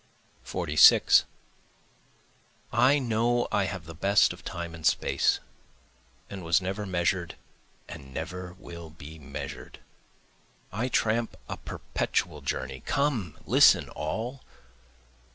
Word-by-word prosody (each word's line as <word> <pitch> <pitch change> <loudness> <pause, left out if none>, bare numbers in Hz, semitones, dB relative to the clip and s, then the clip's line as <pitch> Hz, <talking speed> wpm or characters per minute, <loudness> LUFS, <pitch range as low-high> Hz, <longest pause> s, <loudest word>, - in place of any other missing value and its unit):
46 75 0 +5 1.5
I 135 +3 +5
know 120 -1 +1
I 100 - +2
have 95 -3 -5
the 80 - -9
best 100 +5 +3
of - - -14
time 85 -1 -6
and 80 -1 -10
space, - - +2 0.9
and 95 -2 -8
was 85 0 +3
never 95 +2 -4
measured 85 -1 -1 0.5
and 70 -1 -10
never 90 +4 -6
will 85 -3 -10
be 80 0 -12
measured. 70 -1 -8 0.9
I 115 +6 -2
tramp 115 -2 0
a - - -4
perpetual 75 -4 -3
journey, 65 -1 -4
(come 130 - 0
listen - - +5
all!) 115 - -4
90 Hz, 110 wpm, -27 LUFS, 80-110 Hz, 1.5 s, 46